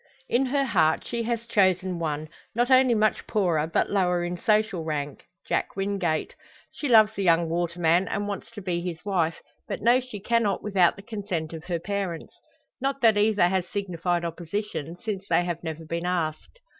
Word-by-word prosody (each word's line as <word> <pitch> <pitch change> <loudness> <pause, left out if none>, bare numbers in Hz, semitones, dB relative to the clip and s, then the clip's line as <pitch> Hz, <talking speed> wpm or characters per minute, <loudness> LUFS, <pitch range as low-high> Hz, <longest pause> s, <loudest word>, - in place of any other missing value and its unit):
In 260 +2 +2
her 275 +2 +1
heart 165 -9 +2
she 235 -1 -3
has 235 -1 -1
chosen 185 -5 +2
one, 155 -1 -2 0.3
not 240 +2 +1
only 255 -2 +6
much 215 0 +1
poorer, 170 -7 +1
but - - +1
lower 180 -3 +2
in 175 0 -2
social 210 -2 +1
rank 145 -3 -4 0.2
Jack - - -1
Wingate. 195 -5 -1 0.4
She 290 - -4
loves 220 -2 +6
the 200 - -4
young 170 -2 +3
waterman, 170 +1 +1
and 205 0 -2
wants 200 -1 -5
to 205 -3 -8
be 175 -2 -1
his 175 0 -6
wife; 170 -5 0 0.2
but - - -3
knows 245 +3 +4
she 250 -5 -8
cannot 215 -2 +1
without 195 -4 +3
the 195 - -12
consent 195 -8 -4
of 160 +1 -8
her 175 -2 -1
parents. 190 -2 -4 0.5
Not 275 +1 -1
that 225 -3 +5
either 205 -3 +3
has 185 -1 0
signified 175 -3 -2
opposition, 170 0 -4
since 200 -4 -4
they 175 - +3
have 175 -1 -4
never 160 -1 -5
been 170 +2 -3
asked. 170 - -2
185 Hz, 180 wpm, -26 LUFS, 170-215 Hz, 0.5 s, only